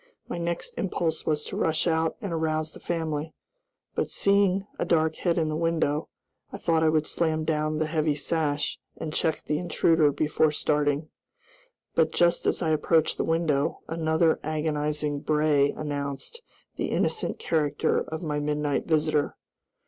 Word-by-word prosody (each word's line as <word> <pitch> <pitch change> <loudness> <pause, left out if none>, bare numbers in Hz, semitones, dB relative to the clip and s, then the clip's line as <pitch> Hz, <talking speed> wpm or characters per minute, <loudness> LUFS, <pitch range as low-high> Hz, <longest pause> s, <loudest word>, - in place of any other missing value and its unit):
My 175 - -4
next 170 0 -3
impulse 175 -4 -1
was 150 -1 +1
to - - -6
rush 160 -1 +1
out 160 -1 +1
and 195 -5 -3
arouse 155 -1 -1
the - - -12
family, 160 -2 -3 0.6
but, - - -1
seeing 200 -1 +2
a - - +2
dark 160 -2 +2
head 175 -2 0
in 160 -2 +2
the 155 - -1
window, 160 -2 0 0.4
I - - -5
thought 165 -2 +1
I 160 - +4
would 155 -1 +2
slam 160 -1 0
down 155 -1 0
the 155 - +1
heavy 155 -1 0
sash 150 -1 -1 0.2
and 155 -2 -5
check 160 -1 0
the 150 0 0
intruder 165 -3 +3
before 150 +2 +2
starting. 150 0 0 0.8
But 160 -1 +3
just 170 +1 +2
as - - +1
I 160 - +1
approached 155 +1 +2
the - - 0
window, 160 -4 0
another 160 0 +2
agonizing 150 -1 -1
bray 150 -1 +3
announced 145 - -4 0.4
the - - -1
innocent - - 0
character 150 -3 +1
of 160 +2 -5
my 150 -2 -1
midnight 150 -1 -1
visitor. 155 -2 +1
155 Hz, 155 wpm, -27 LUFS, 150-165 Hz, 0.8 s, I